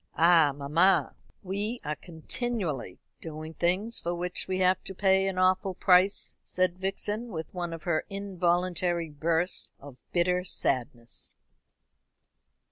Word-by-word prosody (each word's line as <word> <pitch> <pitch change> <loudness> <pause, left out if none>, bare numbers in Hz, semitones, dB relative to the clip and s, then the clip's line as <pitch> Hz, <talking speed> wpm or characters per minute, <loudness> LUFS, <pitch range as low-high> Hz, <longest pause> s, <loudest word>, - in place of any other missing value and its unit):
"Ah, 165 -3 +6
mamma, 150 +7 +3 0.3
we 205 +5 -2
are 150 +1 -1
continually 165 - -4 0.2
doing 155 0 -7
things 185 +8 0
for 175 +1 -2
which 180 +1 -3
we 185 0 -1
have 185 0 +2
to 190 - -6
pay 190 0 +3
an 190 -1 -2
awful 185 +1 +2
price," 185 +2 +3
said 185 -1 0
Vixen, 205 +4 -2
with 165 -8 -6
one 175 -2 -3
of 165 -1 -7
her 170 -3 0
involuntary 180 -3 0
bursts 165 +4 -1
of 140 -2 -12
bitter 180 +1 +2
sadness. 120 -8 -2
180 Hz, 125 wpm, -28 LUFS, 160-190 Hz, 0.3 s, Ah